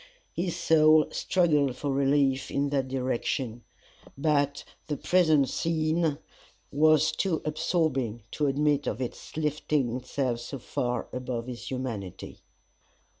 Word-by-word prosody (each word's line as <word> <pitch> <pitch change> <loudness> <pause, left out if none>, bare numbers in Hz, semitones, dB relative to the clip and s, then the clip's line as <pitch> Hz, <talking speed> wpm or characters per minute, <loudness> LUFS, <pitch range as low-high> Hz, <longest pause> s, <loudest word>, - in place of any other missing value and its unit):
His 175 0 -2
soul 155 -2 +5
struggled 150 -8 +2
for 145 +2 -3
relief 135 0 +2
in 140 0 0
that 135 -2 0
direction, 125 -2 -2 0.5
but 145 -1 +1 0.2
the 150 -2 -2
present 160 -6 +3
scene 160 -1 0 0.5
was 155 +1 +4
too 175 -5 -1
absorbing 150 - -1
to 150 - 0
admit 145 +1 +1
of 110 - -2
its 130 +3 -6
lifting 150 -4 0
itself 125 -2 -2
so 135 +3 -6
far 125 -1 -3
above 125 -2 -3
his 120 -1 -7
humanity. 120 - -5
140 Hz, 120 wpm, -28 LUFS, 130-155 Hz, 0.5 s, soul